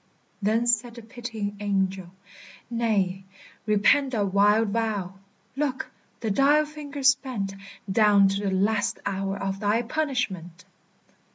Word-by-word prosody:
Then 220 +3 +1
said 240 0 +1
the 235 - -10
pitying 225 -3 -6
angel, 195 -3 -1 0.6
"Nay, 200 -5 0 0.4
repent 215 +6 +3
That 200 -4 0
wild 205 +2 +4
vow! 205 -4 -2 0.4
Look, 275 -2 -2 0.3
the 220 -3 -1
dial 290 +7 +4
finger's 285 -3 +1
bent 210 -9 -5 0.3
Down 200 0 +5
to 195 +1 -2
the - - -2
last 205 +3 +1
hour 195 0 -2
of 195 0 -3
thy 210 +3 +1
punishment!" 230 - -3
210 Hz, 120 wpm, -25 LUFS, 195-240 Hz, 0.6 s, Down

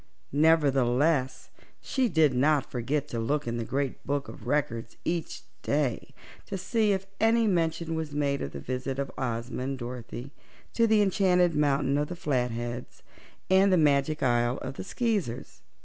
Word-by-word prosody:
Nevertheless, 140 -2 +2 0.3
she 260 -3 0
did 160 -6 +3
not 140 +3 +2
forget 135 +4 -1
to 115 - -3
look 145 +6 -1
in 120 0 -2
the 115 - -2
Great 135 +2 -2
Book 140 0 -2
of - - -10
Records 115 -6 -1
each 170 -1 -3 0.2
day 140 -5 -1 0.3
to 195 - -3
see 210 +3 +1
if 195 -1 -1
any 225 +1 +4
mention 165 -4 0
was 160 -2 -3
made 145 -1 0
of 70 - -4
the 70 - -7
visit 130 - -4
of 140 -1 -3
Ozma 120 -1 -3
and 135 +1 -3
Dorothy 120 +1 -7 0.4
to 230 -1 +3
the 215 -1 +4
Enchanted 180 -3 +3
Mountain 140 -1 +2
of 150 - 0
the 180 - -6
Flatheads 125 -5 -3 0.4
and 190 +1 +5
the 185 - +5
Magic 150 0 +2
Isle 120 0 +2
of 130 - -4
the - - -6
Skeezers. 185 - -2
145 Hz, 165 wpm, -28 LUFS, 125-170 Hz, 0.4 s, and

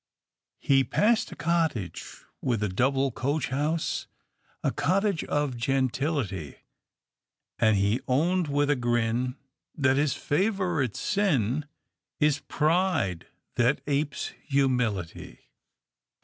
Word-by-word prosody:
"He 135 -1 +3
passed 215 - +2
a - - -8
cottage 160 - -2 0.2
with 115 -5 0
a 105 - 0
double 135 +7 +1
coach 140 +5 -1
house, 150 +5 -1 0.6
A - - +2
cottage 195 +2 +1
of 145 -3 -1
gentility, 130 - -1 1.0
And 110 -3 +4
he 100 +5 +1
owned 165 +6 +2
with 145 0 +1
a - - +3
grin, 120 0 0 0.4
That 135 -2 +2
his 145 -1 +1
favourite 175 - 0
sin 150 - 0 0.5
Is 150 -1 +3
pride 155 - 0 0.3
that 120 +4 +2
apes 140 0 -1
humility." 125 - -1
140 Hz, 105 wpm, -27 LUFS, 120-155 Hz, 1.0 s, And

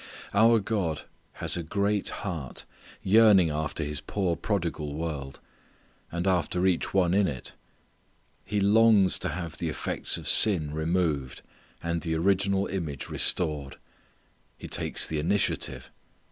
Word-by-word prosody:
Our 115 +3 +5
God 95 -7 -2 0.3
has - - -1
a 90 - -2
great 100 +4 -1
heart 80 -10 -5 0.4
yearning 100 -5 +5
after 75 +1 -3
His 75 0 -3
poor 95 -4 -1
prodigal 85 -5 -3
world, 75 -4 -5 0.7
and 85 +1 -3
after 90 -1 +1
each 95 -2 +1
one 90 -2 +2
in 100 0 +3
it. 65 -4 -6 0.9
He 105 0 -2
longs 105 -1 +4
to - - -2
have 85 0 -6
the 85 - -2
effects - - -2
of - - -7
sin 80 -9 +5
removed, 80 -4 -1 0.4
and 85 0 -2
the 80 -2 -2
original 95 +3 +1
image 80 -8 -4
restored. 75 -6 +1 0.8
He - - -9
takes - - -1
the 80 - -2
initiative. 95 +6 -1
85 Hz, 130 wpm, -27 LUFS, 80-100 Hz, 0.9 s, Our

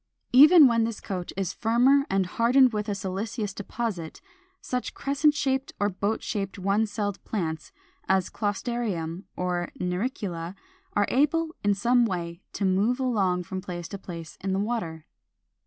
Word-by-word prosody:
Even 300 +4 +9
when 230 -3 +4
this 225 -1 -2
coat 185 -3 -5
is 195 -3 -1
firmer 255 +5 +3
and 195 -1 +2
hardened 245 +6 +4
with 210 0 -2
a 205 - -1
siliceous 200 +2 -3
deposit, 205 -5 -4 0.4
such 250 -1 -4
crescent 290 +2 +2
shaped 270 -1 -1
or 205 - +2
boat 205 +3 -2
shaped 200 -3 -3
one 200 +3 +1
celled 205 -1 -3
plants 160 -7 -3 0.4
as 190 -1 +3
Closterium 205 -5 -3
or 180 -1 -2
Naricula 180 -2 -3 0.4
are 205 - +3
able 315 +5 +1
in 205 0 +3
some 240 +4 +3
way 170 -2 -4
to 200 - -1
move 205 +7 +2
along 195 -9 +1
from 185 +2 -5
place 175 -3 -6
to 200 - -6
place 165 -4 -9
in 190 0 -1
the 190 - 0
water. 200 -8 -3
205 Hz, 155 wpm, -26 LUFS, 185-240 Hz, 0.4 s, Even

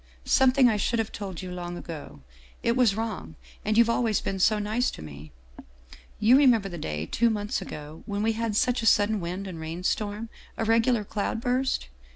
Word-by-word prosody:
" - - -28
' - - -29
Something 265 0 +5
I 220 -3 +2
should 235 +3 0
have 225 -1 -1
told 190 -4 -6
you 180 - -6
long 175 -1 -5
ago 155 - -9 0.4
it 235 - +2
was 245 -6 +3
wrong, 220 -7 -4 0.3
and 215 +1 0
you've 235 0 +6
always 230 -3 +1
been 195 - -3
so 215 +3 +4
nice 215 +4 0
to - - -9
me 75 0 -10 0.3
' - - -29
" - - -20
You 235 +5 +6
remember 235 -8 +4
the 175 -2 -7
day, 75 - -3
two 235 - +2
months 210 +2 -2
ago, 150 +2 -8
when 205 -1 -2
we 225 - +2
had 225 -1 -2
such 250 +3 +2
a 225 - 0
sudden 205 0 +4
wind 180 +3 -4
and 180 -4 -7
rain 160 +3 -6
storm, 210 +3 -2 0.3
a 225 - -1
regular 225 0 +3
cloud 205 +2 -2
burst 250 - 0
210 Hz, 215 wpm, -27 LUFS, 175-230 Hz, 0.4 s, you've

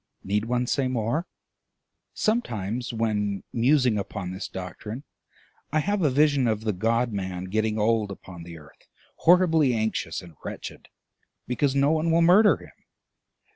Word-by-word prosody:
Need 105 +2 0
one 125 +1 0
say 130 +2 0
more? 130 +7 -1 0.9
Sometimes, 120 - -1
when 105 -3 -1
musing 125 -2 +3
upon 95 -2 -5
this 95 +2 -5
doctrine, 105 +7 -7 0.7
I 155 - +1
have 200 +6 0
a 155 - +3
vision 140 -1 +3
of 110 -1 0
the 110 -1 -1
God 115 +5 0
man 95 -2 -4
getting 110 +3 -1
old 110 -1 +1
upon 95 -3 -10
the 85 0 -9
earth, 75 -2 -18 0.3
horribly 165 -7 +4
anxious 110 -6 -2
and 85 -2 -13
wretched, - - -8 0.6
because 130 +2 0
no 140 +2 +3
one 160 +1 +1
will 165 +1 +4
murder 200 +5 +6
him. - - -17
115 Hz, 145 wpm, -25 LUFS, 100-145 Hz, 0.9 s, murder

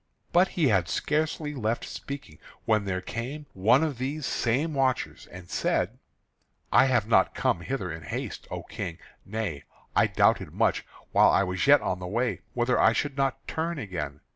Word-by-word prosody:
But 180 +2 +5
he 155 -6 +4
had 95 -5 +2
scarcely 150 - -1
left 115 -3 -1
speaking 140 - -8 0.3
when 110 -2 +2
there 95 -1 -2
came 125 +10 -5
one 110 +10 +4
of 145 -6 -2
these 140 +3 -3
same 135 +9 0
watchers 135 -2 0
and 90 0 -11
said: - - -1 0.7
"I 135 - +6
have 125 -5 +2
not 115 - +3
come 85 - +1
hither 100 -3 -3
in 80 0 -6
haste, 80 - -5
O - - -5
King, 80 - -6 0.3
nay, 100 -9 -3 0.3
I - - +5
doubted - - +2
much, - - +1 0.2
while - - +6
I - - +4
was 90 +2 -1
yet 145 +1 +7
on 90 - -2
the 90 - -5
way, 120 +6 -1
whether 125 +1 +2
I 115 - +5
should 140 +2 -1
not 135 -1 -1
turn 165 +1 -2
again. 90 - -5
120 Hz, 175 wpm, -27 LUFS, 95-140 Hz, 0.7 s, yet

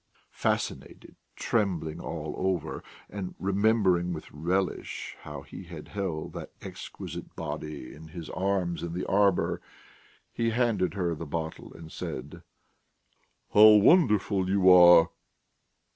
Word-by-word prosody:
Fascinated, - - -3 0.2
trembling 90 -9 -1
all - - -5
over, 95 -4 -2 0.2
and 95 -2 -6
remembering 95 -3 +2
with 80 - -8
relish 90 +5 -2
how 75 -2 -8
he 95 - -10
had 85 -3 -10
held 95 -6 -4
that - - -7
exquisite - - -8
body 75 -3 -6
in 80 +1 -12
his 80 0 -8
arms 95 -3 -1
in 85 -1 -4
the 90 - -3
arbour, 100 -2 +2 0.7
he 115 -1 0
handed 115 -6 0
her 90 -4 0
the 80 0 -7
bottle 80 +1 -5
and 80 -1 -11
said: 65 +3 -7 1.1
"How 105 +1 +9
wonderful 105 - +4
you 95 -1 +5
are!" 85 -2 +8
90 Hz, 120 wpm, -28 LUFS, 80-100 Hz, 1.1 s, How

